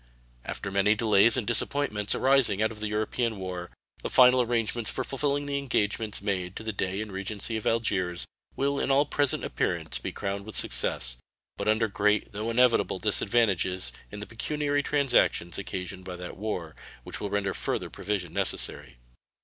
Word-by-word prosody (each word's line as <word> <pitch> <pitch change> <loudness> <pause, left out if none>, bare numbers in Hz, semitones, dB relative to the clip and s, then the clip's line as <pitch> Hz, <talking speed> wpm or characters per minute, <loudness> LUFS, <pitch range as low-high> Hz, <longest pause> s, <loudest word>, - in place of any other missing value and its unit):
After 100 - -5
many 100 +2 +3
delays 110 +1 +5
and 120 - -1
disappointments 115 -2 +1
arising 130 -7 +3
out 110 +1 +2
of 110 - -9
the 105 - -2
European 110 +2 -1
war, 90 -2 -5 0.3
the - - -3
final 125 0 +7
arrangements 115 -1 0
for - - -2
fulfilling 145 +1 -1
the 140 0 -1
engagements 110 -5 -1
made 95 -2 -2
to - - -6
the 110 0 -3
Dey 95 +1 -2
and 110 -1 -6
Regency 100 +4 -2
of 110 - -2
Algiers 95 -6 0 0.3
will 140 +1 0
in - - 0
all 140 +2 +4
present 145 -1 +1
appearance - - -2
be - - -4
crowned 100 0 -4
with 110 +1 -7
success, - - +1 0.4
but - - -4
under 110 +1 +3
great, 105 +1 +1
though 105 +2 -3
inevitable, 125 +1 +3
disadvantages 95 - +1 0.2
in 105 - -8
the 105 - -5
pecuniary 145 +6 -1
transactions 135 - +1
occasioned 95 -1 -5
by 90 -1 -6
that 90 0 -7
war, 90 -6 -4 0.3
which - - -7
will 100 - -2
render 100 -1 -1
further - - -2
provision 95 -3 -3
necessary. 65 -1 -2
105 Hz, 170 wpm, -28 LUFS, 95-120 Hz, 0.4 s, final